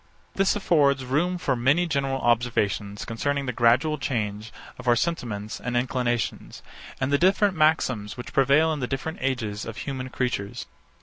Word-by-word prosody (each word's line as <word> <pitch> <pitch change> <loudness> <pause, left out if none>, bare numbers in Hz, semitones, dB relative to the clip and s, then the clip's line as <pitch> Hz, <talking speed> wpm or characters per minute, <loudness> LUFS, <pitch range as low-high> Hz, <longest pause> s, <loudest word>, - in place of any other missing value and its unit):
This 195 0 +2
affords 140 -9 +2
room 170 +8 0
for 140 -7 0
many 140 +9 +2
general 135 -4 -1
observations 105 -4 0
concerning 140 +5 -2
the 125 - -2
gradual 130 +7 +3
change 110 -5 -3 0.3
of 125 - -9
our 120 - +5
sentiments 115 -8 -3
and 125 0 -2
inclinations, 120 -2 -2 0.4
and 135 +1 0
the 140 - +4
different 195 +2 +3
maxims 130 -10 +1
which 125 - -8
prevail 140 +4 +4
in 150 - -4
the 125 - -2
different 135 +5 -4
ages 115 -6 -2
of 115 -1 -7
human 130 -2 -5
creatures. 125 -6 -3
130 Hz, 160 wpm, -25 LUFS, 120-150 Hz, 0.4 s, our